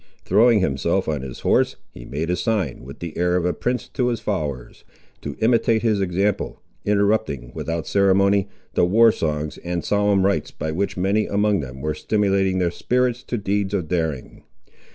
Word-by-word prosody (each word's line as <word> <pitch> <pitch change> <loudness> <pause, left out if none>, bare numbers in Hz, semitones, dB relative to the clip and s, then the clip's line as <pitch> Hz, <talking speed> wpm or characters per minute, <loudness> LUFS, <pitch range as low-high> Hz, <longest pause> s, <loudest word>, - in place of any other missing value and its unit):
Throwing 115 -1 +4
himself 70 -7 0
on 75 -3 -1
his 65 -2 -8
horse, - - +2 0.2
he - - -11
made 80 +5 -3
a - - +2
sign, 95 - -1
with 70 +2 -10
the 85 -2 -7
air 90 0 +1
of 90 -1 +1
a 90 - +1
prince 125 0 -2
to 125 -1 -1
his 120 -2 -1
followers, 75 - -4 0.4
to 70 -1 -5
imitate 115 -1 +3
his 110 -3 +2
example, 95 +2 -1 0.2
interrupting, 100 - 0
without 85 0 -3
ceremony, 100 0 +3 0.3
the - - +2
war 110 +6 +5
songs 75 -4 -3
and 85 -1 -4
solemn 100 -2 +2
rites 100 0 +1
by 80 - -4
which 95 +5 -2
many 100 +4 +1
among 105 0 +1
them 65 -2 -7
were 75 +1 -1
stimulating 95 +1 +1
their 90 -2 +1
spirits 125 +5 0
to 125 - -4
deeds 100 -1 -1
of 90 -5 -2
daring. 80 -6 -3
95 Hz, 175 wpm, -22 LUFS, 80-105 Hz, 0.4 s, war